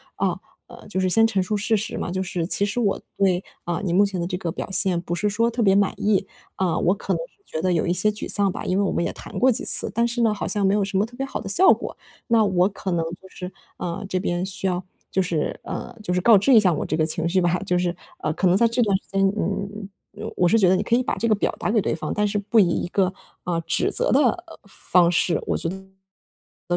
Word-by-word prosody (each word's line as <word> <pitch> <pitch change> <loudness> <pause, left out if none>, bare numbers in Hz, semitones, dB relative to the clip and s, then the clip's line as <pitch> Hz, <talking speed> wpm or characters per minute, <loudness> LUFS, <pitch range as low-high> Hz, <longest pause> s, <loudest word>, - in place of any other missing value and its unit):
啊， - - -1 0.3
呃， - - -14
就 190 -2 -3
是 185 - +1
先 225 +4 +4
陈 195 -4 0
述 210 +4 -2
事 210 +2 +1
实 210 - -4
嘛， - - -3
就 185 +1 -2
是 175 -3 -3
其 200 - +1
实 205 +4 -2
我 210 -5 0 0.2
那 190 -2 +1 0.2
啊， 175 0 -2
你 175 - -1
目 195 +3 +5
前 195 -2 -2
的 170 - -2
这 180 - -3
个 170 -3 -3
表 190 - -6
现 185 -2 +2
不 175 - -5
是 210 +4 0
说 230 +3 +1
特 235 +1 -2
别 195 -3 +4
满 200 -1 +2
意， 200 -2 +1 0.3
啊， 185 -3 0
我 180 +3 +2
可 205 - -3
能 - - -1 0.3
觉 160 - -5
得 185 +1 +1
有 165 - 0
一 175 - 0
些 180 +4 +2
沮 210 0 -5
丧 200 -2 +2
吧， - - -6
因 185 - 0
为 200 - +2
我 195 - 0
们 - - 0
也 - - -2
谈 - - -9
过 260 +1 +4
几 225 - -1
次， - - +7
但 235 +1 +1
是 235 +1 -2
呢， 225 -2 +3
好 205 - -4
像 205 -2 +2
没 195 - +3
有 205 0 +2
什 195 0 -2
么 200 - +2
特 245 +2 -14
别 270 - -2
好 270 - -5
的 195 - -7
效 370 - +6
果， - - -7 0.3
那 230 -2 +3
我 185 -1 +2
可 195 -1 -5
能 170 -1 0 0.2
就 190 - -14
是 180 0 -8 0.3
啊， 170 +1 -4
这 185 - -2
边 175 0 -2
需 190 0 -2
要 180 0 -2 0.3
就 190 - +1
是， 170 -4 -2
呃， - - -6
就 180 -4 -2
是 180 - 0
告 220 +2 +6
知 260 +8 +3
一 230 - +8
下 185 -3 +3
我 150 - -3
这 - - -2
个 155 0 +1
情 160 +1 -1
绪 185 +2 +1
吧。 175 -1 +1
就 180 -2 +1
是， 175 -1 0 0.3
呃， - - -2
可 190 - +1
能 180 - +4
在 235 - +4
这 235 +2 0
段 205 -4 +2
时 - - -19
间， 195 0 +2
嗯， 200 +2 -4 0.5
我 180 - +3
是 225 - +4
觉 190 -5 +4
得 185 - +4
你 195 - -1
可 230 - +1
以 250 - +1
把 - - -2
这 230 - -1
个 215 - +3
表 200 - -1
达 - - -2
给 220 -1 +2
对 - - -1
方， 155 -1 -4
但 210 - 0
是 205 0 -2
不 210 +3 -1
以 185 -4 +4
一 170 - -1
个， 190 0 0 0.3
啊， 175 -1 -1
指 165 - -1
责 - - 0
的 - - +5
方 - - +4 0.4
式， - - -17 1.8
我 175 - +2
195 Hz, 300 characters per minute, -23 LUFS, 180-210 Hz, 1.8 s, 一